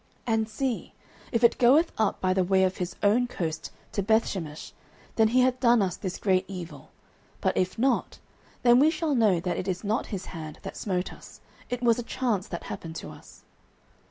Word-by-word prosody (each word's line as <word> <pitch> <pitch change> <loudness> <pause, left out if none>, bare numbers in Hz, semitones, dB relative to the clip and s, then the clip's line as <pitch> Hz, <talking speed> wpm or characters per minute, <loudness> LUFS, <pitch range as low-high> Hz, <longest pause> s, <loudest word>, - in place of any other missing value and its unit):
09:006:009 230 - 0
And 220 0 -1
see, 250 +2 -3 0.4
if 230 -1 0
it 235 - +5
goeth 280 +7 +5
up 220 -2 0
by 185 0 +1
the 190 0 +2
way 190 +1 +3
of 185 0 0
his 180 0 -4
own 230 +5 +4
coast 165 -8 -4 0.2
to 200 - -1
Bethshemesh, 190 -7 -1 0.4
then 220 -1 +5
he 250 +3 +3
hath 255 0 +2
done 235 -3 +4
us 185 -1 -1
this 185 -3 -5
great 185 -2 +2
evil: 180 -3 -8 0.5
but - - 0
if 185 0 0
not, 255 +2 +1 0.5
then 240 0 +6
we 300 +3 +6
shall 320 -2 -1
know 215 -8 +3
that 175 +1 -2
it 185 - -4
is 185 +1 -2
not 215 +3 -1
his 190 -4 -5
hand 155 -3 -7
that - - -7
smote 185 -2 -2
us: - - -14 0.3
it 245 0 -3
was 235 0 +4
a - - 0
chance 230 -5 -1
that 170 - -6
happened 165 -1 -7
to - - -6
us. - - -15
210 Hz, 205 wpm, -27 LUFS, 185-240 Hz, 0.5 s, then